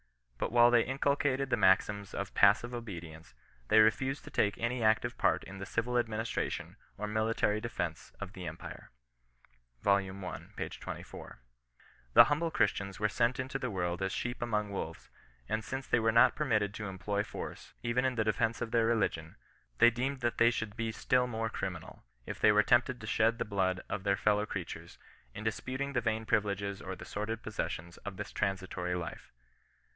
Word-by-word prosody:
But - - -1
while 120 0 +6
they 120 -1 +6
inculcated 135 0 0
the - - +3
maxims 100 +1 +3
of 100 -2 -4
passive 105 +4 +4
obedience, 85 - -8 0.3
they 110 - +4
refused 130 +6 +3
to - - -11
take 100 -1 +1
any 120 +1 -1
active 115 +2 +2
part - - +2
in 95 0 -9
the 100 - -5
civil 120 +2 0
administration 115 -1 -2 0.2
or 105 - -3
military 110 0 +1
defence 120 0 -4
of - - -6
the - - -7
empire." - - -8 0.9
Vol. 100 0 +5
I. 95 -1 -5 0.2
p. - - -3
24. - - -8 0.4
" - - -29
The - - +12
humble 150 +3 0
Christians 100 - 0
were 105 - +3
sent 120 +4 +1
into 130 +1 -3
the 130 - -2
world 90 -3 -2
as 95 0 0
sheep 120 +4 -3
among 105 -3 -1
wolves, 100 - -6 0.4
and 110 0 -1
since 130 +3 -4
they 120 - +3
were 110 0 +3
not 115 +1 +6
permitted 110 -9 +1
to 105 0 -5
em 95 -1 -6
ploy 100 +2 -1
force, - - -8
even 120 +1 +1
in 130 -1 +1
the 110 - +1
defence 110 +2 0
of 115 -1 -3
their 115 -1 +3
religion, 95 -8 0 0.4
they 120 +1 +7
deemed 130 +3 -2
that 120 -1 -1
they 115 - +7
should 110 -3 -3
be 115 -1 -2
still 125 +2 +2
more 115 -1 -2
criminal, - - -5 0.2
if - - -6
they 105 - +6
were 105 0 +5
tempted 125 +2 +3
to 110 - -8
shed 115 +2 +2
the - - -2
blood 95 -3 0
of 100 - -4
their 100 0 +2
fellow 105 0 +2
creatures, 95 -5 -6 0.4
in 110 - -6
disputing 130 +5 -2
the 125 - +1
vain 110 0 -1
privileges 100 -2 0
or 95 0 -5
the - - -10
sordid 105 +2 -4
possessions 85 -5 -4
of 100 -2 -8
this - - -5
transitory 95 -2 -2
life. 85 -1 -6
110 Hz, 190 wpm, -32 LUFS, 100-120 Hz, 0.9 s, The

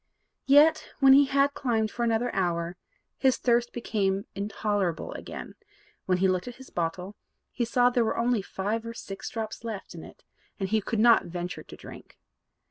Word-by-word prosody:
Yet, 300 +3 +5
when 270 -1 +7
he 280 +1 +7
had 275 +1 +2
climbed 225 -6 0
for 240 - -3
another 235 +1 0
hour, 175 -2 -1 0.4
his 265 -2 +3
thirst 240 -1 +1
became 200 -4 -1
intolerable 200 -3 -2
again; - - -7
and, - - -17 0.5
when 185 -1 +2
he 190 +1 +3
looked 185 +2 0
at 245 - -7
his 265 +1 -14
bottle, 180 +4 -3 0.4
he 240 - -1
saw 245 +1 +3
that - - -13
there 240 -2 +2
were - - -1
only 235 -2 +1
five 205 +4 -3
or 230 0 -7
six 195 -3 -7
drops 220 0 -5
left 220 -4 -6
in - - -9
it, - - -14 0.4
and 195 -1 -2
he 220 0 +2
could 225 +3 -3
not 230 +2 +5
venture 175 +1 -5
to - - -12
drink. - - -13
220 Hz, 190 wpm, -27 LUFS, 195-245 Hz, 0.5 s, when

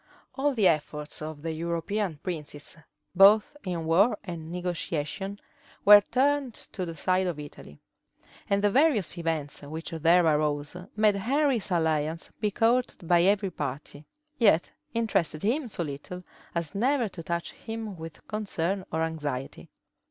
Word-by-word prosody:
All 280 0 0
the 210 -5 +4
efforts 150 -1 -1
of 155 -1 -6
the 165 - -2
European 170 +3 -2
princes, 150 -4 -4 0.4
both 200 +7 +6
in 175 -4 -3
war 185 +9 +4
and 170 -4 -7
negotiation, 180 +2 -3 0.5
were 205 0 +10
turned 265 +1 +1 0.2
to 185 -3 -4
the 165 - -6
side 185 +4 +1
of 170 -4 -3
Italy; 145 - -11 0.7
and 200 0 +2
the 205 - +4
various 260 - +3
events 160 -4 -2
which 155 +3 -7
there 165 +2 +4
arose, 150 -1 +1 0.2
made 210 -1 +3
Henry's 260 +1 +1
alliance 160 -2 0
be 210 - +1
courted 230 -3 +1
by 175 0 +5
every 195 +1 +2
party, 145 0 -6 0.3
yet 200 -8 +4 0.2
interested 195 -9 0
him 250 +6 +1
so 185 -6 -3
little 155 +5 -7 0.3
as 170 -3 -2
never 245 +3 +1
to 185 -3 -8
touch 170 +1 -3
him 225 -3 -6
with 165 -1 -10
concern 195 -3 -2
or 160 0 0
anxiety. 145 -5 -4
175 Hz, 145 wpm, -28 LUFS, 160-210 Hz, 0.7 s, were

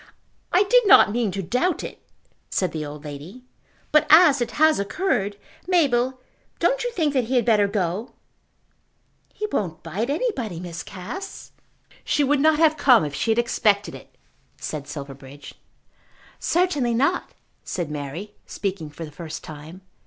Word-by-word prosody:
"I 365 +3 +5
did - - +4
not 385 - +7
mean 230 -1 0
to 195 +1 -4
doubt 255 - 0
it," - - -8 0.5
said 185 -3 0
the 155 -1 -4
old 150 0 -8
lady. 150 - -9 0.5
"But 305 - +4
as 310 -5 +7
it 240 - 0
has 310 -2 +4
occurred, 205 - -1 0.3
Mabel, 260 -8 +2 0.4
don't - - +1
you 485 - -2
think 315 -8 0
that 260 -4 +1
he 255 +3 -2
had 245 - +3
better 210 -4 +4
go?" 200 +2 -2 1.2
"He 425 - -4
won't 180 -6 -2
bite 195 - -3
anybody, 275 - -2
Miss 170 -2 -6
Cass." 235 - -8 0.5
"She 295 - +1
would 285 +1 +2
not 310 +1 +4
have 315 -1 +4
come 250 - +5
if 145 - -5
she 225 - -2
had 220 - +3
expected 210 -3 +1
it," - - -13 0.4
said 145 -2 -6
Silverbridge. 140 -1 -9 0.9
"Certainly 295 -10 +1
not," 280 +9 0 0.3
said 170 -5 -4
Mary, 150 +8 -6
speaking 185 -6 -4
for 160 +3 -8
the 150 - -11
first 160 +1 -8
time. 155 +4 -10
220 Hz, 155 wpm, -23 LUFS, -, 1.2 s, not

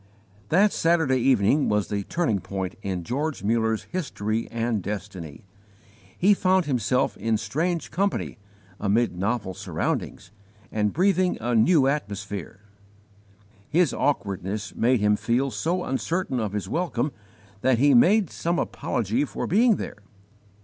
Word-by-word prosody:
That 195 +5 +4
Saturday 160 -6 +2
evening 130 +2 +3
was 105 -1 0
the 100 -1 -1
turning 115 - 0
point 95 0 -4
in 95 -3 -3
George 140 - -3
Muller's 110 0 +1
history 115 - -3
and 115 -2 -1
destiny. 95 -6 -6 0.7
He 200 +3 +5
found 185 -2 +2
himself 125 -2 0
in 110 +2 0
strange 160 +9 -2
company, 190 - -1 0.4
amid 105 0 +1
novel 100 +1 -2
surroundings, 90 -1 -3 0.4
and 105 -1 0
breathing 185 +1 +2
a 120 +2 -1
new 135 +6 +4
atmosphere. 100 - -3 1.1
His 175 +2 +3
awkwardness 100 -5 -2
made 120 0 +2
him 105 0 +4
feel 130 +5 0
so 180 +6 -1
uncertain 135 +1 -1
of 105 -3 -2
his 105 -2 -3
welcome 150 -6 -1 0.5
that 130 0 +3
he 140 +3 +4
made 190 - +5
some 170 +1 -1
apology 115 +3 -1
for 150 - -4
being 225 +4 +4
there. 105 - -6
120 Hz, 130 wpm, -25 LUFS, 105-160 Hz, 1.1 s, He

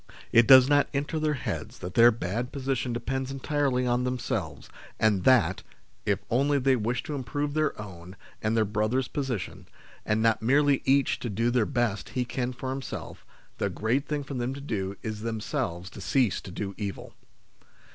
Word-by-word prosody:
It 115 0 +6
does 130 -1 +9
not 145 0 +3
enter 145 +3 -1
their 155 -1 +1
heads 130 - -5
that 90 0 -7
their 120 +3 +7
bad 115 +3 -3
position 130 -2 -2
depends 130 +2 -2
entirely 135 -2 0
on 125 0 +1
themselves, 125 -2 -3 0.3
and 105 -5 +2
that, 105 -9 +4 0.5
if - - +3
only 140 +4 +3
they 135 0 +3
wish 120 +1 -1
to 150 - -5
improve 145 +2 -2
their 155 -5 0
own 90 -3 -9 0.3
and 110 +1 0
their 110 - +3
brothers' 110 +5 0
position, 130 -9 -4 0.4
and 105 +1 +1
not 115 -1 +3
merely 140 +4 +3
each 135 0 +3
to 120 - -4
do 115 +4 0
the 120 -3 +2
best 120 -6 -1
he 125 - +1
can 125 +1 -2
for 130 +1 -5
himself, 135 0 -6 0.4
the - - 0
great 125 +6 -1
thing 150 -1 -2
for 140 - -7
them 125 +1 -2
to 140 - -8
do 100 -7 -3
is 110 -2 -4
themselves 105 -6 -3
to - - -10
cease 120 -2 +1
to - - -10
do 100 +2 -4
evil. 100 -2 -5
125 Hz, 180 wpm, -27 LUFS, 110-135 Hz, 0.5 s, does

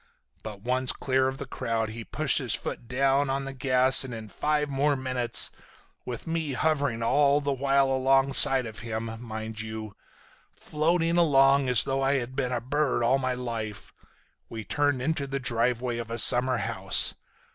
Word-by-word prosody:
But 105 -2 -9
once 125 +3 0
clear 130 0 0
of 130 0 -4
the 140 - -6
crowd 115 -4 -3
he 115 +1 -7
pushed - - +1
his - - -1
foot 120 - -6
down 135 +2 +1
on 135 +1 -2
the 135 - -6
gas 130 0 +3
and 125 -3 -7
in 110 -1 -9
five 150 +5 -1
more 140 +1 +1
minutes—with 125 -1 -4
me 165 -3 -3
hovering 140 -5 0
all 140 +3 +3
the 140 -1 -2
while 135 0 +1
alongside 135 0 +5
of 110 -1 -8
him, 110 0 -5
mind 110 -1 -6
you—floating 150 - -4
along 140 -4 +4
as 125 -3 +5
though 135 0 -2
I 135 +1 +2
had 130 -1 -3
been 130 -2 -1
a 125 - -1
bird 135 +1 -1
all 130 +4 +2
my 130 -1 -1
life—we 115 -1 -8
turned 145 +3 -1
into 145 -1 -1
the 135 0 -3
driveway 120 0 -1
of 115 -1 -6
a 115 - -4
summer 125 +2 +2
home. - - -5
130 Hz, 165 wpm, -26 LUFS, 115-140 Hz, -, alongside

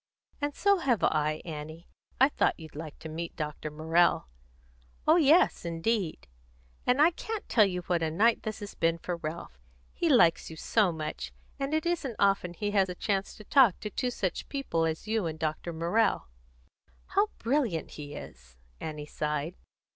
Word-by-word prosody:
"And 290 0 -1
so 400 -1 +3
have 250 - +1
I, 155 0 +1
Annie. 155 +1 -7 0.3
I 265 +2 +6
thought - - +1
you'd 160 -2 -11
like 155 0 -7
to - - -9
meet 165 +2 -5
Dr. 150 -1 -4
Morrell." 160 - +2 0.8
"Oh 315 +2 +7
yes, 320 +2 +4
indeed!" 170 - -1 0.6
"And 250 +2 +3
I 320 +4 +6
can't 440 +5 -5
tell 215 -3 +5
you 180 -2 -2
what 175 -1 0
a 160 - +1
night 220 +8 +3
this 215 -1 -5
has 205 - -7
been 165 0 +1
for 175 +1 -4
Ralph. 155 - -6 0.3
He 340 - 0
likes 230 - +4
you 160 - -8
so 200 +4 +2
much, 150 - -5 0.3
and 275 +1 -2
it 315 - 0
isn't 320 -9 -1
often 195 -3 +2
that - - -22
he 205 0 0
has 195 -2 +3
a 180 - -4
chance 195 +1 -1
to 215 - -12
talk 240 -3 +5
to 210 - -5
two 250 +3 -1
such 195 -7 -3
people 270 - -1
as 160 +6 -4
you 220 -4 0
and 160 -1 -4
Dr. 155 +2 -2
Morrell." 170 - +1 0.8
"How 405 +2 +3
brilliant 235 - 0
he 145 -1 -8
is!" 65 - -11 0.2
Annie 150 -1 -5
sighed. 150 +2 -2
175 Hz, 180 wpm, -29 LUFS, 155-235 Hz, 0.8 s, Oh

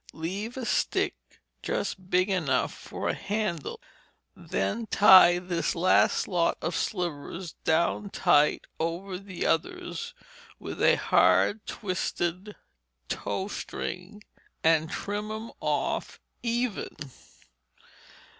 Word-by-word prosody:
Leave 200 +9 -4
a 255 - -3
stick - - +1 0.5
just 185 -1 -3
big 185 +1 +3
enough 160 -10 0
for - - -6
a - - +1
handle. 200 - -3 0.6
Then 220 - -2
tie 185 -4 +8
this 175 -1 -2
last 180 +2 +3
lot 175 -3 +1
of 170 +1 -3
slivers 175 -2 -3
down 170 +5 +1
tight 150 -6 +3
over 180 +3 -3
the 195 -2 -5
others 165 - -2 0.4
with - - -7
a - - +6
hard 95 - +3
twisted 185 0 -3 0.5
tow 190 - -2
string, 205 0 -6 0.4
and 160 -1 +3
trim 205 +4 -4
'em 220 +1 -6
off - - -1 0.2
even. 240 -2 -2
185 Hz, 105 wpm, -28 LUFS, 165-205 Hz, 0.6 s, tie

